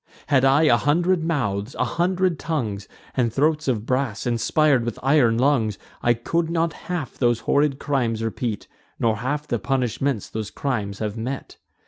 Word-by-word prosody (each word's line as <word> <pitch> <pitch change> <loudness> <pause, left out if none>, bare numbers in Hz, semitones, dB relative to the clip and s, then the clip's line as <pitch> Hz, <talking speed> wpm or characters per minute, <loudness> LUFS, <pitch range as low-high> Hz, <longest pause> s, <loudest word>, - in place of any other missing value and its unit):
Had 135 -3 +4
I 135 +3 +5
a 135 -7 +5
hundred 170 +6 +2
mouths, 120 -9 -1
a - - +1
hundred 180 -1 0
tongues, 110 -12 -3 0.3
And 120 -3 +1
throats 155 +4 +1
of 115 -5 0
brass, 125 -3 -1
inspir'd 125 +3 +2
with 120 -2 -4
iron 130 -5 +4
lungs, 120 -6 +2 0.2
I 120 0 +3
could 165 +8 -1
not 165 -1 0 0.2
half 175 -8 -4
those 120 -2 +2
horrid 145 -1 +2
crimes 125 -6 -1
repeat, 115 -1 -3 0.3
Nor 110 -2 +1
half 145 +6 -2
the 120 - -1
punishments 130 -2 -1
those 110 -2 -5
crimes 105 -8 -3
have 105 0 -3
met. 130 +4 -5
130 Hz, 160 wpm, -23 LUFS, 115-150 Hz, 0.3 s, I